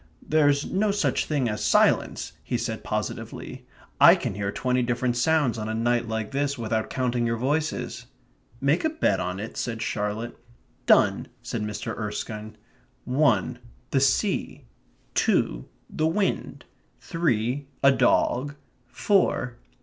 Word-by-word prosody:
"There's 145 -2 +3
no 205 +3 0
such 205 +1 0
thing 140 -5 0
as 105 -1 -3
silence," - - +2
he - - -1
said - - -4
positively. - - -5 0.3
"I - - +9
can - - -3
hear 100 0 -2
twenty 125 +4 0
different 120 0 0
sounds 135 -2 +2
on 110 0 -4
a 110 - -2
night 120 +1 +1
like 110 0 -3
this 140 0 -1
without 110 -1 -2
counting 125 -2 0
your 115 0 0
voices." 135 -3 -2 0.5
"Make 140 +5 +2
a 315 - +2
bet 320 +1 +1
of 90 0 -3
it?" 110 +2 -7
said 115 -1 -3
Charlotte. 105 +3 -3 0.5
"Done," - - +4 0.2
said 115 - -3
Mr. 105 0 -4
Erskine. 110 0 -5 0.5
"One, 125 -3 +2 0.3
the 135 - +3
sea; 140 +9 0 0.5
two, - - +1 0.2
the 155 - 0
wind; 195 +4 -1 0.3
three, 140 - -1 0.2
a 140 - +8
dog; 130 +2 +2 0.3
four 155 - +1
125 Hz, 135 wpm, -25 LUFS, 110-145 Hz, 0.5 s, I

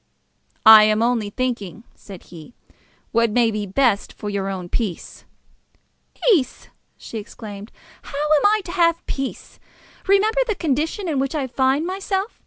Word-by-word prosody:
"I 220 -1 +10
am 215 +1 +2
only 230 -3 0
thinking," 230 -4 -4
said 195 -3 -13
he, 170 +7 -14 0.6
"what 230 0 +2
may 230 +1 +2
be 210 -1 -4
the - - -13
best 230 -3 +1
for 210 - -6
your 195 -1 -2
own 185 -2 -5
peace." 195 -2 -4 1.0
"Peace!" 360 - +1 0.3
she 225 - -7
exclaimed. 210 -1 -10 0.3
"How 280 - -9 0.2
am 290 - 0
I 430 +1 +2
to 345 - -7
have 335 -2 +1
peace? 270 -1 -6 0.5
Remember 425 +5 +3
the 435 - -1
condition 320 +5 -2
in 300 -5 -1
which 275 +3 -2
I 285 -3 -1
find 265 +4 0
myself! 385 +3 -3
245 Hz, 155 wpm, -21 LUFS, 210-335 Hz, 1.0 s, I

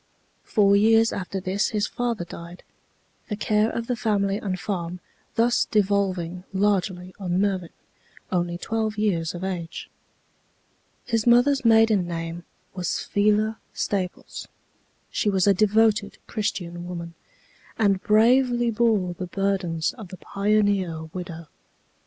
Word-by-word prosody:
Four 200 -2 +3
years 225 +2 +4
after 195 0 -4
this 190 +2 0
his 210 -2 0
father 235 -7 -2
died, 170 +1 -10 0.7
the 210 - -1
care 210 +1 +1
of 230 - -3
the 245 - -1
family 200 -3 0
and 190 -3 -3
farm 180 -3 -4 0.4
thus 235 +1 +3
devolving 190 -4 0
largely 190 -2 0
on 180 -2 -1
Mervin, 190 -4 0 0.6
only 175 -1 0
twelve 220 +2 -2
years 175 -6 0
of 175 - -6
age. 175 -4 -5 1.1
His 230 -2 0
mother's 255 +3 +5
maiden 225 -5 +4
name 165 0 -5 0.3
was 180 -2 -2
Phila 215 +2 +1 0.2
Staples. 185 -3 -3 0.6
She 210 - 0
was 190 -2 +2
a 200 - +6
devoted 215 +1 +2
Christian 175 -5 -3
woman, 170 -1 -6 0.6
and 200 -4 +2
bravely 240 +2 +4
bore 215 -5 +1
the 180 +1 -6
burdens 185 -4 -1
of 215 - -8
the 185 - -10
pioneer 200 -5 0
widow. 175 -2 -6
200 Hz, 125 wpm, -24 LUFS, 180-215 Hz, 1.1 s, a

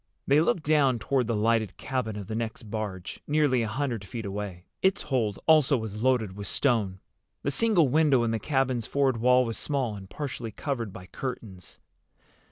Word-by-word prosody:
They 145 +3 +4
looked 165 0 +1
down 145 -4 +3
toward 125 +1 0
the 115 - 0
lighted 110 -2 +1
cabin 125 -5 -3
of 105 -2 -6
the 110 - -6
next 110 0 -3
barge, 105 -4 -5
nearly 145 -4 +3
a 115 - -1
hundred 120 -2 -2
feet 110 +3 -6
away. 100 -3 -5 0.2
Its 190 +1 +2
hold 115 -8 0
also 155 -3 +5
was 110 -2 -5
loaded 120 -6 +1
with 100 -1 -6
stone. 105 -9 +1 0.4
The 140 - 0
single 185 -2 +4
window 140 -2 +3
in 115 - 0
the 115 - -1
cabin's 130 -3 0
forward 135 -3 +1
wall 125 +2 +4
was 115 -1 -3
small 130 -7 -1
and 95 -1 -10
partially 125 -5 -5
covered 115 -1 -3
by 90 -1 -10
curtains. 100 - -7
120 Hz, 180 wpm, -27 LUFS, 105-140 Hz, 0.4 s, also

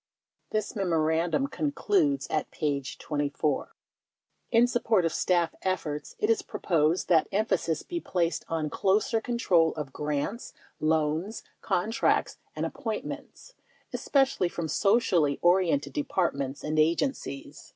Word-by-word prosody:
This 215 +2 -2
memorandum 165 - +1
concludes 295 +1 +1
(at 155 - -1
p. 145 -2 -1
24): 145 -1 -2 0.8
In 235 +1 +6
support 225 -6 +2
of 165 - 0
staff 175 -2 +1
efforts 155 -6 -3
it 420 - 0
is 450 -3 +3
proposed 170 - 0
that 165 -3 +4
emphasis 195 -6 0
be 345 - -4
placed 170 - -1
on 155 -2 -2
closer 210 +3 +1
control 180 -9 +2
of 145 -4 -5
grants, 150 +9 -3 0.3
loans, 160 +6 0 0.2
contracts 200 +3 +1 0.2
and - - -2
ap - - -4
pointments - - -6 0.2
— - - -35
especially 270 -10 +2
from 170 -1 -4
socially 180 - +2
oriented 185 +9 +3
Departments 145 - -1
and 155 +1 0
agencies. 165 - -1
175 Hz, 120 wpm, -28 LUFS, 155-225 Hz, 0.8 s, In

